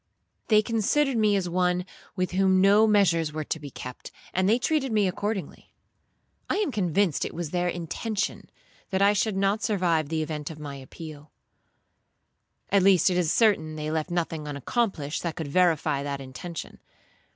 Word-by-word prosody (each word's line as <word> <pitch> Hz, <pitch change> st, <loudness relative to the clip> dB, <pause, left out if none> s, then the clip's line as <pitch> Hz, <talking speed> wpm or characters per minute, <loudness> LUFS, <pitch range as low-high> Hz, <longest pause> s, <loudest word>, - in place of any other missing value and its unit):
They 215 Hz, -1 st, +5 dB
considered 240 Hz, +6 st, +1 dB
me 215 Hz, -2 st, +3 dB
as 190 Hz, -3 st, 0 dB
one 180 Hz, 0 st, +1 dB, 0.3 s
with 185 Hz, -2 st, -1 dB
whom 190 Hz, 0 st, +3 dB
no 200 Hz, +3 st, +5 dB
measures 170 Hz, -7 st, +3 dB
were 155 Hz, 0 st, -4 dB
to 160 Hz, -, -3 dB
be 145 Hz, -1 st, -8 dB
kept, 125 Hz, -1 st, -9 dB, 0.2 s
and 185 Hz, +1 st, +2 dB
they 225 Hz, -, +4 dB
treated 270 Hz, 0 st, 0 dB
me 210 Hz, -3 st, +3 dB
accordingly. 205 Hz, +2 st, -4 dB, 0.8 s
I -, -, +1 dB
am 410 Hz, -6 st, 0 dB
convinced 190 Hz, -, +1 dB
it -, -, -5 dB
was 165 Hz, -3 st, -4 dB
their 180 Hz, 0 st, 0 dB
intention 180 Hz, +5 st, -3 dB, 0.4 s
that 190 Hz, 0 st, +1 dB
I 200 Hz, +1 st, +5 dB
should 210 Hz, 0 st, 0 dB
not 200 Hz, +2 st, +1 dB
survive 170 Hz, -8 st, +1 dB
the 160 Hz, -1 st, -1 dB
event 150 Hz, -2 st, -5 dB
of 160 Hz, -, -8 dB
my 145 Hz, -2 st, -7 dB
appeal; 150 Hz, +2 st, -10 dB, 1.4 s
at 200 Hz, 0 st, +5 dB
least 190 Hz, 0 st, +5 dB
it 180 Hz, -, 0 dB
is 170 Hz, -3 st, +1 dB
certain 180 Hz, -9 st, +2 dB
they 155 Hz, 0 st, -4 dB
left 160 Hz, -1 st, -2 dB
nothing 165 Hz, -3 st, -2 dB
unaccomplished 150 Hz, -, -2 dB
that 170 Hz, -3 st, -3 dB
could 160 Hz, -4 st, -5 dB
verify 160 Hz, -4 st, +2 dB
that 140 Hz, -1 st, -4 dB
intention. 135 Hz, +5 st, -8 dB
180 Hz, 170 wpm, -26 LUFS, 155-205 Hz, 1.4 s, They